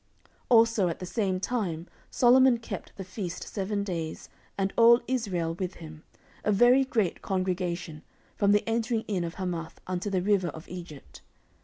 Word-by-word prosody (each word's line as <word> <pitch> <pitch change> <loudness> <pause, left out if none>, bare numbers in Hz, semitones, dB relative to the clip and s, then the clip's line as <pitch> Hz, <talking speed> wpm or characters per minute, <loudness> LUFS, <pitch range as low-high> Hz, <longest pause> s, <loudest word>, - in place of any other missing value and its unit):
14:007:008 - - -30 0.2
Also 230 -4 +5
at 170 - -2
the 185 - -6
same 190 -1 -1
time 185 -7 -2 0.2
Solomon 255 0 +5
kept 225 -4 -7
the 195 - -6
feast 185 -1 -6
seven 200 0 -3
days, 165 -5 -5 0.3
and 195 0 -1
all 235 +1 +7
Israel 190 -10 -1
with 185 +1 -4
him, 155 -2 -11 0.4
a 210 - +2
very 245 +6 +5
great 220 -9 -1
congregation, 180 -4 -2 0.3
from 200 -1 +3
the 205 +1 +2
entering 225 0 0
in 190 -4 -1
of 170 0 -5
Hamath 175 -3 -4
unto 185 +2 -3
the 185 -2 0
river 200 -3 +2
of 160 0 -8
Egypt. 170 -6 -10
190 Hz, 165 wpm, -28 LUFS, 175-225 Hz, 0.4 s, all